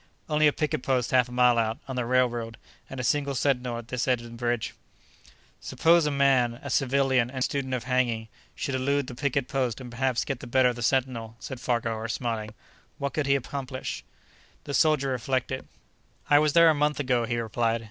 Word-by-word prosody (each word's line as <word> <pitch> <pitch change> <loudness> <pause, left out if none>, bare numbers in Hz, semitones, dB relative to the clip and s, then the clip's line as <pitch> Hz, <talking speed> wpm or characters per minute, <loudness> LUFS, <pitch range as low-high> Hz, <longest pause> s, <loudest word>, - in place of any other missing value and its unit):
"Only 155 -1 +3
a - - +5
picket 150 -3 -2
post 125 -3 0
half 125 -1 +3
a - - -11
mile 125 -1 +4
out, 110 0 0
on 130 - -5
the 125 -2 -2
railroad, 120 -2 0 0.3
and 135 - -7
a - - -2
single 140 +1 0
sentinel 125 -2 0
at 120 0 -9
this 125 0 -2
end 125 -2 +2
of 120 0 -10
the - - -9
bridge." 120 -2 -2 0.9
"Suppose 165 -1 +3
a - - +2
man—a 135 -4 +1
civilian 135 -2 +2
and 130 -1 -2
student 130 -2 -1
of 125 - -4
hanging—should 125 0 -2
elude 140 +2 0
the 125 - -8
picket 130 +1 -1
post 130 -4 -1
and 125 -2 -9
perhaps 125 0 0
get 135 -3 -3
the 120 - -9
better 125 +1 +4
of 120 - -3
the 120 - -7
sentinel," 120 -3 0
said 130 -1 -7
Farquhar, 115 -2 -1
smiling, 115 -2 -3 0.4
"what 140 -1 -3
could 150 -3 -1
he 140 - +4
accomplish?" 130 0 -4 0.6
The 140 - -6
soldier 150 -3 +3
reflected. 130 +1 -2 0.6
"I 145 - +8
was 150 -1 +2
there 170 -1 +7
a - - +2
month 150 0 0
ago," 125 -4 +1
he 120 - -1
replied. 115 0 0
130 Hz, 200 wpm, -27 LUFS, 120-140 Hz, 0.9 s, I